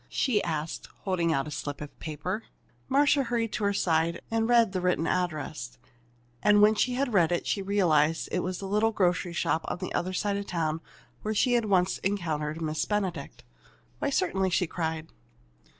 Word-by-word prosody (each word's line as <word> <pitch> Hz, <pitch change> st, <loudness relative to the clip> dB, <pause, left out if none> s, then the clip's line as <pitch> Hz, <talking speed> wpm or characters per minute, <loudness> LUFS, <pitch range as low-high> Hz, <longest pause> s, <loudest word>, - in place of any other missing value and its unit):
she 230 Hz, -7 st, +1 dB
asked, 155 Hz, -1 st, -3 dB
holding 175 Hz, -4 st, 0 dB
out 135 Hz, -2 st, 0 dB
a -, -, -6 dB
slip 145 Hz, 0 st, -4 dB
of 150 Hz, -1 st, -9 dB
paper. 160 Hz, +8 st, -4 dB, 0.4 s
Marcia 285 Hz, +1 st, +4 dB
hurried 230 Hz, -3 st, -1 dB
to -, -, -2 dB
her 200 Hz, -, +3 dB
side 170 Hz, -3 st, +1 dB
and 225 Hz, 0 st, +1 dB
read 235 Hz, -4 st, +5 dB
the 185 Hz, -1 st, -2 dB
written 180 Hz, -3 st, +1 dB
address. 155 Hz, -9 st, -2 dB, 0.6 s
And 210 Hz, 0 st, +5 dB
when 210 Hz, +1 st, +7 dB
she 245 Hz, +3 st, +1 dB
had 260 Hz, -2 st, -1 dB
read 175 Hz, -5 st, +4 dB
it, 175 Hz, -, 0 dB
she 200 Hz, -, 0 dB
realized 165 Hz, -6 st, +2 dB
that -, -, -3 dB
it -, -, +2 dB
was 185 Hz, 0 st, -2 dB
the 195 Hz, -, -6 dB
little 210 Hz, +3 st, +2 dB
grocery 180 Hz, -3 st, +1 dB
shop 165 Hz, -1 st, 0 dB
on -, -, -2 dB
the 185 Hz, 0 st, -5 dB
other 185 Hz, +2 st, -1 dB
side 200 Hz, +2 st, 0 dB
of 200 Hz, -, -5 dB
town 160 Hz, -2 st, -1 dB, 0.4 s
where 215 Hz, 0 st, -2 dB
she 245 Hz, +4 st, +3 dB
had 235 Hz, -2 st, +2 dB
once 190 Hz, -2 st, +2 dB
encountered 160 Hz, -5 st, -2 dB
Miss 155 Hz, 0 st, -1 dB
Benedict. 190 Hz, -8 st, -3 dB, 0.6 s
"Why, -, -, 0 dB
certainly!" 190 Hz, -1 st, +1 dB
she 180 Hz, 0 st, +2 dB
cried. 160 Hz, -1 st, -3 dB
180 Hz, 190 wpm, -28 LUFS, 160-210 Hz, 0.6 s, when